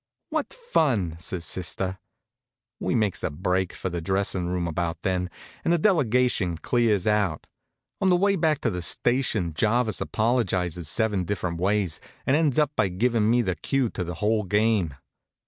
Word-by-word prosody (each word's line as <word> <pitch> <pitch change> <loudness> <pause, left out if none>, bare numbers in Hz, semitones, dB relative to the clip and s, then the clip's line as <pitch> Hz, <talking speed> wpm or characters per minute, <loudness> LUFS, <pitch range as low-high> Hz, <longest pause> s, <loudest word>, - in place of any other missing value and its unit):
"What - - -1
fun!" 135 - 0
says 85 0 -4
sister. 95 +1 -3 0.8
We - - -1
makes 105 -4 +1
a - - -1
break 90 +4 -1
for 95 - -4
the 85 -1 -3
dressin' 95 0 -1
room 90 -1 -1
about 85 0 -3
then, 90 -1 0 0.3
and - - +1
the 175 - +4
delegation 125 - +2
clears 110 -1 +1
out. 105 -7 +1 0.6
On 190 - +3
the 180 - +5
way 200 +2 +3
back 160 -4 +1
to 115 - +1
the 90 -2 -3
station 105 - +1
Jarvis 110 +5 +1
apologizes 95 -8 0
seven 105 -5 +1
different 90 -2 -3
ways, 95 -2 0 0.2
and 130 - +3
ends 150 -4 +2
up 150 -2 +3
by - - +2
givin' 110 +4 +1
me 120 +1 +3
the 95 -4 0
cue 135 +3 0
to 90 - -3
the 85 0 -5
whole 105 +4 +1
game. 105 -5 +1
100 Hz, 165 wpm, -25 LUFS, 90-120 Hz, 0.8 s, the